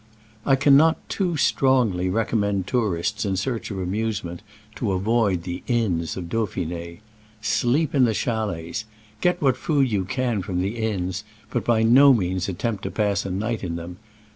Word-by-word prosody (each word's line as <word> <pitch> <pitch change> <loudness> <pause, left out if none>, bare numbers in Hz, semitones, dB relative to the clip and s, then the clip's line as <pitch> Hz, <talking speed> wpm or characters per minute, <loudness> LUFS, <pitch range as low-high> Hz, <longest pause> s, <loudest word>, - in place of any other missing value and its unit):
I 135 - +6
cannot 145 +4 +5
too 180 -5 -1
strongly 125 -10 +2
recommend 100 -2 0
tour 105 -4 0
ists 105 +5 -2
in 100 -2 -1
search 115 +4 -2
of 100 - -5
amusement 95 -2 -3 0.4
to 105 -6 -1
avoid 100 -2 +1
the 90 0 -5
inns 95 -10 0
of 95 - -4
Dauphin^. 85 -5 -3 0.4
Sleep 120 +8 +1
in 135 -3 +5
the 110 -2 0
chalets. 110 -5 -2 0.4
Get 180 0 +2
what 135 -3 +4
food 140 -5 +1
you 100 -3 0
can 120 0 -1
from 90 -1 -3
the 100 +6 -2
inns, 95 -3 -2 0.3
but - - -1
by 115 -2 +2
no 135 +5 +7
means 95 -2 -1
attempt 105 +3 -2
to - - -1
pass 100 -2 0
a - - -4
night 110 +4 -2
in 85 -2 -3
them. 85 +1 -7
105 Hz, 165 wpm, -23 LUFS, 90-120 Hz, 0.4 s, no